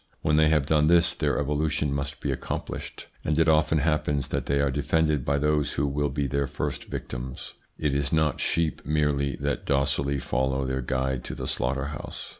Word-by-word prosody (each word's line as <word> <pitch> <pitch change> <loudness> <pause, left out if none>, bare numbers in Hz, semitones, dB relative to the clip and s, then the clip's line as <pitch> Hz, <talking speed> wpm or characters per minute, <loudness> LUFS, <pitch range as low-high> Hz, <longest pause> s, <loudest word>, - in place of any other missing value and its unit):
When 75 - +3
they 80 0 +5
have 75 -3 +3
done 75 0 +3
this, 85 +1 +5
their - - 0
evolution 75 0 0
must 70 0 -3
be - - -1
accomplished, - - -5 0.2
and 75 0 0
it 80 0 +4
often 80 0 +4
happens 75 -3 0
that - - -2
they 70 0 +2
are 70 -1 +2
defended 75 0 +1
by 70 +2 +1
those 75 0 +1
who 70 - 0
will 70 +1 0
be 70 +1 -1
their 70 +1 0
first - - -4
victims. 65 +1 -6 0.2
It 75 -2 0
is 70 -1 0
not 80 -3 +1
sheep 80 -3 0
merely 75 -3 +1
that 70 0 -2
docilely 70 0 +1
follow 65 +1 0
their 65 0 -1
guide 65 0 -1
to - - -5
the - - -5
slaughter 65 +2 -1
house. - - -7
70 Hz, 195 wpm, -26 LUFS, 70-75 Hz, 0.2 s, they